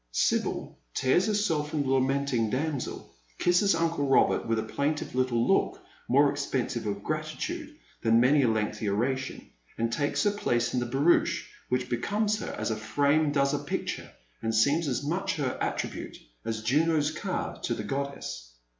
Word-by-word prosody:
Sibyl - - 0 0.2
tears 175 +10 +3
herself 185 -9 +1
from 150 -2 0
the 135 - -3
lamenting 135 -3 +1
damsel, 140 +2 -3 0.2
kisses 175 +1 +3
uncle 165 -3 0
Robert 135 - +3
with 115 0 +1
a 110 - 0
plaintive 140 +7 -2
little 125 -2 +1
look - - +2 0.3
more 140 +3 +5
expressive 130 -5 -2
of 100 0 -3
gratitude 295 - -4 0.3
than 115 0 +4
many 140 +4 +5
a 130 - +3
lengthy 110 -1 0
oration, 130 +6 -2 0.3
and 115 0 0
takes 145 +2 0
her 205 - +3
place 120 -12 0
in 125 - +2
the 120 - -2
barouche, 165 +6 +2 0.2
which 125 0 0
becomes 210 - 0
her - - -4
as - - -1
a - - 0
frame 145 +7 +2
does 140 -1 +2
a 145 - 0
picture, 145 0 -4 0.3
and 115 0 -1
seems 145 +8 +3
as 130 +1 -1
much 185 +6 -1
her 140 -4 -1
attribute - - -3 0.3
as 110 -1 -3
Jvno's 150 +4 +2
car 155 - -3
to - - -1
the - - -4
goddess. 135 - -4
140 Hz, 165 wpm, -28 LUFS, 120-155 Hz, 0.3 s, more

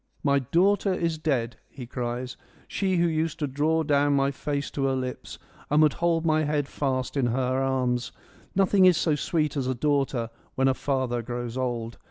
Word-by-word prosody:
' - - -40
My 140 -1 +3
daughter 190 - +2
is 165 -3 -1
dead; 125 -7 -1
' - - -41
he 130 - -9
cries, 125 +1 -4 0.2
' - - -28
she 190 -2 0
who 170 0 +3
used 160 -1 -1
to 150 - -1
draw 150 +4 +1
down 145 -1 +2
my 140 0 +2
face 140 0 -3
to 135 - -1
her 135 -1 +1
lips 130 -1 -5 0.3
and 150 - +3
would 150 -2 +4
hold 170 -1 +2
my 155 -1 +3
head 145 -2 0
fast 130 -3 -2
in 135 -4 +2
her 130 +2 0
arms. 125 -2 0 0.4
Nothing 195 0 +4
is 180 -3 +6
so 160 - +1
sweet 150 0 -1
as 135 -3 -1
a 130 - 0
daughter 135 -4 0 0.2
when 135 0 +2
a 135 - +4
father 130 -3 -1
grows 120 0 -5
old. 120 -3 -3
140 Hz, 205 wpm, -26 LUFS, 125-155 Hz, 0.4 s, is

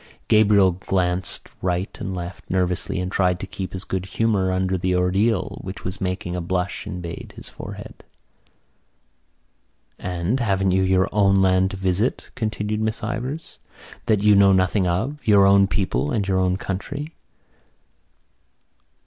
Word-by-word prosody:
Gabriel 105 -3 +5
glanced 90 0 -2
right 90 +1 -1
and 95 - -4
left 90 +1 -7
nervously 90 0 0
and 90 0 -3
tried 90 -2 +1
to - - -4
keep 95 0 -6
his 95 0 -4
good 95 -1 -3
humour 100 -3 +1
under 95 0 0
the 90 0 0
ordeal 95 +4 +1
which 95 +1 -7
was 95 +2 -5
making 90 -1 -2
a 90 - -2
blush 90 +4 -2
invade 90 -4 -7
his - - -9
forehead. - - -9 2.0
"And 90 +7 -1
haven't 95 -5 +1
you 95 +1 +3
your 95 0 +3
own 100 -2 +3
land 95 0 +3
to 95 - -6
visit," 95 +5 -1
continued 105 -1 -2
Miss 110 0 -2
Ivors, 125 +8 -4 0.5
"that 105 -2 +2
you 105 0 +6
know 100 -1 +6
nothing 95 +1 +2
of, 115 +13 -1
your 100 -2 +6
own 100 0 +6
people, 100 +9 -1
and 110 -8 -1
your 95 -1 +2
own 90 0 +1
country?" 140 - -5
95 Hz, 150 wpm, -23 LUFS, 90-105 Hz, 2.0 s, you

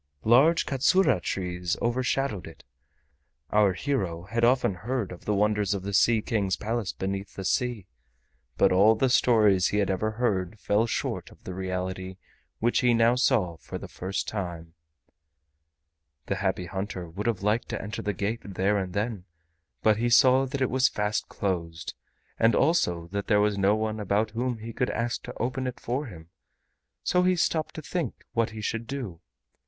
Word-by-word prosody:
Large 135 +9 +5
katsura 140 - +3
trees 90 -2 -2
overshadowed 125 -4 -1
it. 80 -3 -13 0.9
Our 105 -2 +4
hero 95 - -2
had 115 +5 -2
often 125 -4 +3
heard 110 +3 -3
of 90 - -10
the 105 - +1
wonders 105 -1 +1
of 95 - -5
the 100 +1 -4
Sea 110 +2 +4
King's 100 -5 0
Palace 115 -1 -2
beneath 95 +1 -4
the 95 - -5
sea, 120 -2 0 0.7
but 100 - +4
all 100 +4 +5
the 130 +3 +1
stories 105 -7 +4
he 105 - -1
had 100 -2 +2
ever 100 +3 0
heard 105 -4 -1
fell 105 +3 +1
short - - -3
of - - -19
the 95 - -6
reality 95 0 -4 0.4
which 120 +2 +1
he 125 -2 +3
now 115 +1 +4
saw 115 -9 +1
for - - -7
the - - -8
first 95 +2 -4
time. 85 -5 -5 1.5
The - - -2
Happy 90 - -1
Hunter 95 -1 -5
would 100 +7 -5
have 110 -5 -1
liked 105 +3 +1
to - - -3
enter 105 +1 -5
the 105 - -1
gate 105 +5 -2
there 100 +1 0
and 95 -2 -4
then, 105 -2 -2 0.6
but 110 -1 +4
he 120 +2 +1
saw 130 +2 +5
that 135 +1 -4
it 130 - +1
was 130 0 +3
fast 105 0 -1
closed, 85 -4 -3 0.5
and 115 -1 +4
also 90 - +2
that 100 +1 -3
there 105 - +4
was 105 0 +2
no 100 +1 +3
one 110 0 -2
about 105 +2 0
whom 120 +1 -2
he 115 +1 -8
could 125 - 0
ask 115 +1 -2
to - - -8
open 130 +2 -1
it 125 - -5
for 130 +4 -3
him, 80 -6 -12 0.7
so 180 - +2
he 185 0 +3
stopped 160 -2 0
to 155 - -6
think 160 -5 -4
what 115 -1 +1
he 110 0 -8
should 115 +2 -3
do. 120 -12 -5
105 Hz, 180 wpm, -27 LUFS, 95-120 Hz, 1.5 s, Large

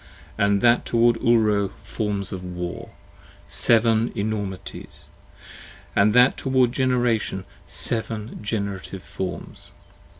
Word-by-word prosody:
And 100 -1 +2
that 120 0 +4
toward 120 0 +3
Ulro, 110 -4 +3 0.2
forms 100 -1 -3
of 95 -1 -5
war: 90 -1 -5 0.6
seven 115 0 +3
enormities: 100 -2 -5 0.9
And 105 +2 +4
that 125 +1 +6
toward 130 -2 +2
Generation, 120 -7 0 0.2
seven 110 -1 -3
generative 100 -3 -4
forms. 95 -1 -6
110 Hz, 95 wpm, -24 LUFS, 100-120 Hz, 0.9 s, that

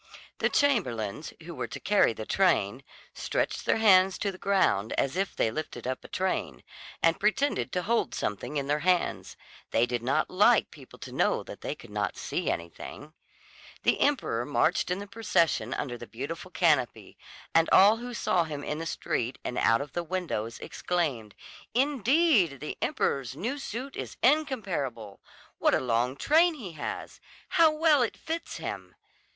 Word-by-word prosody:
The - - +2
chamberlains, 150 - 0
who 170 +1 -8
were - - -4
to - - -7
carry 205 - +3
the 110 -1 -6
train, 135 - +1 0.3
stretched - - -2
their - - +3
hands 190 -3 +5
to 200 - -1
the 185 - -12
ground 150 - +2
as 135 +3 0
if 195 +1 -1
they 110 - +1
lifted 145 -5 -6
up 130 0 -3
a - - -10
train, 185 0 -2 0.4
and 165 0 +3
pretended 215 +8 +1
to 180 - 0
hold 235 +4 0
something 105 +8 -3
in 140 - -1
their 145 +2 0
hands; 180 +2 0 0.3
they 115 - +3
did 120 -1 -2
not 135 +6 +1
like 210 +5 +4
people 135 -4 -14
to - - -9
know - - +1
that - - -10
they - - -3
could - - -14
not - - -2
see - - -2
anything. 85 - -6 0.7
The - - +2
emperor 260 - +1
marched 150 +7 +1
in 180 - 0
the 200 - -6
procession 185 - 0
under 120 -3 -4
the 120 - -9
beautiful 160 +9 -6
canopy, 150 -10 +1 0.4
and 165 0 +4
all 205 +4 +7
who 245 +1 -7
saw 180 -5 +1
him 145 -2 -6
in 150 +2 -3
the 165 - -4
street 125 -3 -2
and 125 - -4
out 115 +4 +3
of 145 - -7
the 175 - -1
windows 160 -11 -3
exclaimed: 140 - -2 0.4
"Indeed, 260 - +3
the 150 - -5
emperor's 130 -2 -1
new 245 - -3
suit 265 +1 -6
is - - -6
incomparable! 190 - 0 0.4
What - - +3
a - - +2
long 125 +1 0
train 320 - +3
he 215 - -7
has! 155 -2 -6 0.3
How 330 -1 +5
well 305 -2 +3
it 240 - -1
fits 330 +1 -5
him!" - - -6
170 Hz, 170 wpm, -28 LUFS, -, 0.7 s, all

